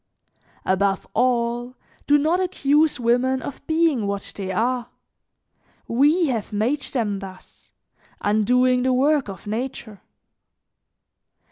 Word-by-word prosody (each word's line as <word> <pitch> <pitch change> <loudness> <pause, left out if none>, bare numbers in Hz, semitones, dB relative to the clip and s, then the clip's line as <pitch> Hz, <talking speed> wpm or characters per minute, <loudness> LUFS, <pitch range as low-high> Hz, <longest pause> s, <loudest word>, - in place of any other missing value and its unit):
"Above 195 +1 +1
all, 240 0 0 0.3
do 290 - +5
not 315 +5 +1
accuse 300 -5 +2
women 245 +2 +2
of 270 - -7
being 315 -9 +2
what 200 0 -4
they 190 -2 -4
are; 240 +4 -1 1.0
we 295 +9 +3
have 240 -7 -2
made 230 +8 0
them 220 -7 -2
thus, 190 -1 -13 0.5
undoing 250 +5 +2
the 255 0 +1
work 280 -1 +2
of 190 -3 -9
nature. 220 -1 -5
250 Hz, 110 wpm, -22 LUFS, 210-280 Hz, 1.0 s, do